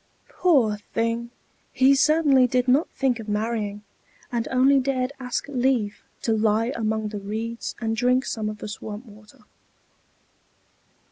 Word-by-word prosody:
Poor 260 -13 +2 0.2
thing! 230 +1 -1 0.4
he 265 +1 +5
certainly 285 -2 +4
did 250 +1 0
not 270 +6 +3
think 260 -4 0
of 220 -1 -7
marrying, 210 -1 -2 0.5
and 235 -1 -1
only 265 +2 +4
dared 260 0 -1
ask 250 +1 -3
leave 250 -6 0 0.2
to 225 - +1
lie 220 +2 +1
among 220 -1 -1
the 210 -1 -5
reeds 220 +3 -5
and 225 -1 -1
drink 250 +3 +2
some 215 -2 -2
of 215 - -6
the 210 - -7
swamp 210 +2 -7
water. 215 -1 -17
235 Hz, 140 wpm, -24 LUFS, 215-260 Hz, 0.5 s, he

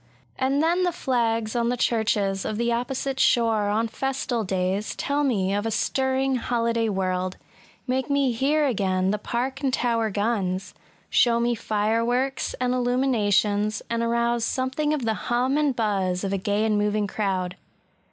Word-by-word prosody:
And 270 +3 +1
then 345 +3 +2
the 360 -1 +2
flags 230 -6 -1
on 235 0 +1
the 245 - -1
churches 210 -5 +1
of 215 - -3
the 235 +1 0
opposite 260 +3 -2
shore 225 -5 +3
on 220 +2 +1
festal 255 -1 -2
days 190 +2 -1
tell 285 +1 -1
me 200 -8 +1
of 205 0 0
a 225 - -1
stirring 265 +3 0
holiday 230 -1 0
world,— 185 -1 -1 0.5
make 260 +2 -1
me 280 -2 +2
hear 285 +6 +1
again 190 -6 +1
the 210 - -1
Park 255 +5 -3
and 270 -2 +1
Towier 230 -3 +1
guns, 195 -3 -1 0.2
— - - -33
show 235 -1 +4
me 240 +1 +1
fireworks 230 +5 0
and 250 0 0
illumi 250 +2 +1
nations, 210 -2 +1
and 230 0 0
arouse 235 0 +1
something 260 +5 -1
of 295 -6 -1
the 220 - +1 0.2
hum 250 +3 +1
and 295 -3 +1
buzz 195 -5 0
of 195 0 -1
a - - +1
gay 205 +2 0
and 210 -1 +2
moving 210 0 +1
crowd. 190 -3 -2
230 Hz, 170 wpm, -25 LUFS, 205-260 Hz, 0.5 s, show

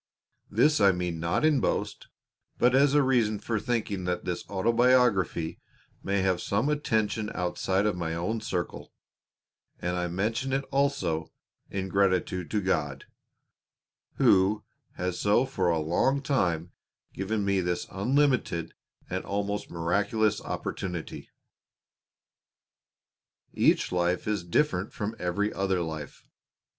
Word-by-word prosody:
This 150 0 +3
I 100 -1 +7
mean 90 -2 -3
not 85 - +1
in 155 -3 +4
boast, - - -2 0.5
but 125 +1 +4
as 140 +2 +4
a 145 - +5
reason 120 -5 +2
for 110 +1 -2
thinking 105 -6 -2
that 90 0 -2
this 90 -1 -3
autobiography 115 -5 +2 0.4
may 100 -1 0
have 95 -2 +1
some 110 +8 0
attention 110 -7 0
outside 95 +2 0
of 105 - +1
my 80 -2 -3
own 105 +7 -2
circle, 90 -6 -4 0.9
and 90 +1 -2
I 90 0 -1
mention 110 +9 -1
it 135 +1 +1
also 135 - 0 0.4
in 95 -1 -3
gratitude 90 -3 +1
to 105 - 0
God, 75 -7 -1 1.1
Who 100 +2 +4 0.3
has 90 -1 -3
for 105 +5 +3
so 85 -7 +1
long 90 - +2
a - - -5
time 90 - 0 0.4
given 100 +2 -2
me 100 -1 +2
this 90 0 -1
unlimited 125 - +1 0.3
and - - -3
almost 100 +1 -3
miraculous 100 +5 0
opportunity. 90 -4 -5 2.2
Each - - +3
life 90 +1 0
is 105 -4 0
different 90 - 0
from 110 +2 -3
every 95 +4 -1
other 95 -2 0
life. 80 -3 -6
100 Hz, 125 wpm, -28 LUFS, 90-115 Hz, 2.2 s, I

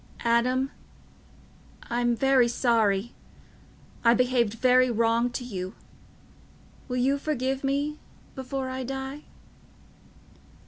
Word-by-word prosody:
"Adam... 250 +3 +2 1.1
I'm 240 0 0
very 265 0 +4
sorry... 230 -3 +1 0.9
I 235 0 +5
behaved 245 -3 +1
very 255 +1 +4
wrong 230 +1 +2
to 245 +1 -5
you... 190 -4 -6 1.1
will 250 -2 -3
you 270 +3 +2
forgive 270 -2 -2
me... 285 +2 -1 0.3
before 265 0 -4
I 260 0 -4
die?" 270 +3 -6
250 Hz, 95 wpm, -26 LUFS, 235-265 Hz, 1.1 s, I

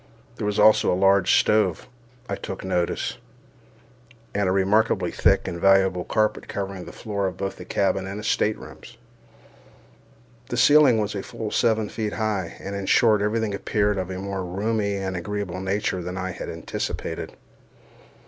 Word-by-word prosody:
There 105 - -2
was 105 - -1
also 110 - +5
a - - +2
large 95 +1 +4
stove, 105 -6 +1 0.4
I - - -2
took 95 - -7
notice, 90 -2 -1 1.1
and 100 -2 +1
a - - +2
remarkably 95 -1 +2
thick 95 +3 +2
and 85 0 -5
valuable 95 -2 +4
carpet 110 0 0
covering 95 -2 -5
the - - -9
floor 100 -3 -3
of 90 -1 -5
both 95 0 -4
the 90 - -9
cabin 95 0 0
and 105 +2 -6
staterooms. 110 0 -2 1.5
The 120 - -3
ceiling 145 -1 +6
was 105 -1 -1
full 105 +2 -5
seven 110 -3 +2
feet 110 -1 -4
high, 105 -6 -2
and, 100 +1 -6
in 100 -1 -4
short, 110 -4 +4
every 105 +2 +1
thing 110 -2 -2
appeared 105 0 0
of 95 0 -4
a 95 - -4
more 95 0 -4
roomy 100 +3 -1
and 95 -1 -3
agreeable 95 0 -4
nature 95 -1 -1
than 90 +2 -5
I 95 0 -3
had - - -7
anticipated. - - -5
100 Hz, 160 wpm, -24 LUFS, 95-105 Hz, 1.5 s, ceiling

